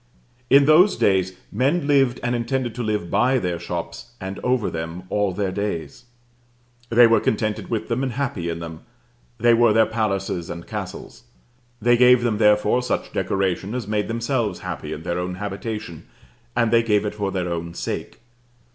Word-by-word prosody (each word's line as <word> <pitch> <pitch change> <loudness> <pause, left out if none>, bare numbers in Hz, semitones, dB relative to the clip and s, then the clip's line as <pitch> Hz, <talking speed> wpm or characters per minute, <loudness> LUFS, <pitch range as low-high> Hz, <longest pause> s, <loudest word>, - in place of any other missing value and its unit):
In 140 0 +6
those 170 +7 +6
days 95 -1 +2 0.2
men 140 +9 +1
lived, 135 -4 +3
and 125 0 0
intended 120 0 -1
to 125 - -5
live 105 -6 -2
by 125 +6 +3
their 90 -7 -2
shops, 85 +7 -6
and 95 +1 -6
over 125 -3 0
them, 80 +2 -5
all 105 -2 +1
their 95 +1 -2
days. 95 - -4 0.8
They 120 +1 +7
were 115 0 +5
contented 110 -2 -1
with 110 -2 -2
them 115 +2 -1
and 130 -2 -2
happy 115 -10 -2
in 85 - -3
them: 80 -1 -7 0.6
they 120 +1 +4
were 115 -1 +4
their 110 0 +5
palaces 100 -6 -2
and 85 0 -7
castles. - - -7 0.5
They 120 +2 +4
gave 125 0 +6
them 110 -3 0
therefore 105 +2 +4
such 125 - -3
decoration 95 +2 -1
as 120 -5 -4
made 105 -1 -1
themselves 115 -3 -1
happy - - -5
in 80 - -6
their 85 +1 -2
own 90 0 -3
habitation, 105 -2 -6 0.5
and 120 -2 +2
they 115 -1 +5
gave 105 -2 +1
it 105 - -2
for 100 -2 -2
their 90 -2 -2
own 85 0 -5
sake. - - -5
105 Hz, 175 wpm, -22 LUFS, 95-120 Hz, 0.8 s, They